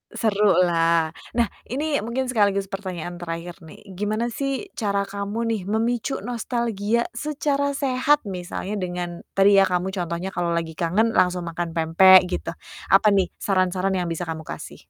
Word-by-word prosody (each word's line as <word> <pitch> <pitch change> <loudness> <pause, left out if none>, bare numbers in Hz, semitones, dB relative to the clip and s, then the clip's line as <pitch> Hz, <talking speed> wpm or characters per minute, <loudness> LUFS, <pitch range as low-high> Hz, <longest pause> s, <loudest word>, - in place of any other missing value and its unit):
Seru 210 -2 +2 0.2
lah. 165 -1 +2 0.2
Nah, 235 -1 +1 0.2
ini 295 +3 -1
mungkin 255 +3 -2
sekaligus 200 -5 +1
pertanyaan 185 -3 -5
terakhir 170 0 -6
nih. 160 - -13 0.2
Gimana 215 +4 -1
sih, 275 - -3
cara 200 -3 -1
kamu 200 +3 -3
nih 225 -3 -1
memicu 225 +6 -1
nostalgia 235 -1 -1
secara 285 +1 -1
sehat 275 -1 +1
misalnya 185 +2 -5
dengan 175 -2 -4
tadi 195 +1 +5
ya, 195 - +7
kamu 180 -1 0
contohnya 175 0 -3
kalau 175 -1 0
lagi 165 -1 -2
kangen 200 +8 +1
langsung 180 -1 +2
makan 170 0 -3
pempek, 180 +3 +6
gitu. 180 -2 -3 0.4
Apa 195 +2 +6
nih 190 -2 +1
saran-saran 185 0 +1
yang 180 -2 -1
bisa 170 +1 -4
kamu 160 -1 -5
kasih? - - -8
195 Hz, 155 wpm, -23 LUFS, 175-230 Hz, 0.4 s, ya